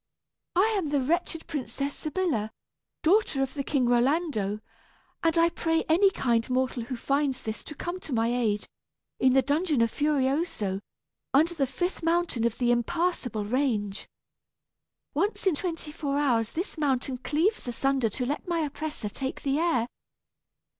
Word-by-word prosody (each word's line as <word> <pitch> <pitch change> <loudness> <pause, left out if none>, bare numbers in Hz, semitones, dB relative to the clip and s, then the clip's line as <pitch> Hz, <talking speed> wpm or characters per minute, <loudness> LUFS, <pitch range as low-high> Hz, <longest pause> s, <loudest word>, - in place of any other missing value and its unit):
I 420 +5 +4
am 340 - -2
the 290 -1 +2
wretched 325 +4 0
Princess 280 -1 -3
Sybilla, 305 - -1 0.5
daughter 325 -6 +3
of 265 - -4
the 285 - -2
King 270 -2 +1
Rolando, 245 - +1 0.6
and 330 0 +2
I 335 0 +5
pray 325 -1 0
any 365 +5 +5
kind 235 -9 0
mortal 255 -2 0
who 255 - -4
finds 275 +1 0
this 220 0 -4
to 300 - -7
come 350 +5 -4
to 315 - -8
my 230 -2 +2
aid, 215 -4 0 0.5
in 260 -1 +4
the 265 0 +5
dungeon 300 0 +1
of 230 - +1
Furioso, 275 - 0 0.6
under 320 +5 +4
the 280 -5 0
fifth 350 +8 -2
mountain 330 -8 +1
of 235 -1 0
the 240 -1 +2
Impassable 245 - 0
Range. 215 -5 -1 1.1
Once 395 +10 0
in 380 - +4
twenty 330 -1 -3
four 285 -3 -2
hours 240 -6 +2
this 345 0 -4
mountain 265 -3 0
cleaves 320 - 0
asunder 260 0 +1
to 250 +4 -3
let 290 +7 -3
my 340 -2 +1
oppressor 295 -5 -3
take 265 +6 -4
the 280 +1 +1
air. 320 -9 +2
280 Hz, 155 wpm, -28 LUFS, 245-330 Hz, 1.1 s, I